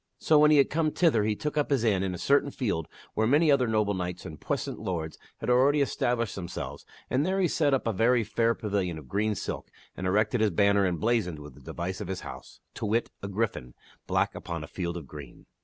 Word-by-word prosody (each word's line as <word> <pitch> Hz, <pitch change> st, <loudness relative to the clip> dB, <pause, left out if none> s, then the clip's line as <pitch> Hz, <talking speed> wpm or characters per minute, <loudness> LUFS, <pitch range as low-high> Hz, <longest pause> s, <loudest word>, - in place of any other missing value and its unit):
So, 155 Hz, -1 st, +4 dB
when 150 Hz, 0 st, +6 dB
he 150 Hz, -, +6 dB
had 140 Hz, -, +4 dB
come 160 Hz, 0 st, +2 dB
thither 150 Hz, -10 st, +2 dB
he 105 Hz, -1 st, +1 dB
took 150 Hz, +6 st, -4 dB
up 145 Hz, -, 0 dB
his 135 Hz, -5 st, +2 dB
inn 105 Hz, -5 st, +2 dB
in 95 Hz, -2 st, -2 dB
a -, -, -6 dB
certain 140 Hz, +10 st, +2 dB
field 100 Hz, -, -2 dB, 0.3 s
where 110 Hz, 0 st, +1 dB
many 150 Hz, +4 st, +4 dB
other 130 Hz, -3 st, +3 dB
noble 105 Hz, -2 st, +1 dB
knights 90 Hz, -1 st, -4 dB
and 75 Hz, -, -9 dB
puissant -, -, -3 dB
lords 85 Hz, -7 st, -4 dB, 0.2 s
had -, -, -6 dB
already 130 Hz, +4 st, +4 dB
established 120 Hz, -4 st, 0 dB
them 90 Hz, -3 st, -5 dB
selves, -, -, -7 dB, 0.2 s
and 130 Hz, +3 st, +2 dB
there 190 Hz, +3 st, 0 dB
he 185 Hz, -, +3 dB
set 150 Hz, -2 st, +1 dB
up 135 Hz, -, +1 dB
a 115 Hz, -, 0 dB
very 115 Hz, +4 st, +3 dB
fair 115 Hz, +2 st, +1 dB
pavilion 100 Hz, -6 st, -2 dB
of 75 Hz, -4 st, -11 dB
green 105 Hz, +4 st, 0 dB
silk, -, -, -5 dB, 0.3 s
and 95 Hz, -, -3 dB
erected 110 Hz, +4 st, +2 dB
his 110 Hz, -, +4 dB
banner 100 Hz, +2 st, +3 dB
emblazoned 90 Hz, -1 st, 0 dB
with 75 Hz, 0 st, -10 dB
the -, -, -16 dB
device 90 Hz, +3 st, -5 dB
of 100 Hz, -, -5 dB
his 95 Hz, 0 st, -4 dB
house; -, -, -10 dB
to 110 Hz, -, -4 dB
wit, 115 Hz, +3 st, 0 dB
a 100 Hz, -, -4 dB
gryphon, 100 Hz, -, -3 dB, 0.3 s
black, -, -, +1 dB
upon 85 Hz, -3 st, -5 dB
a -, -, -7 dB
field 85 Hz, 0 st, -4 dB
of 80 Hz, -, -7 dB
green. 70 Hz, -1 st, -11 dB
105 Hz, 235 wpm, -28 LUFS, 90-130 Hz, 0.3 s, when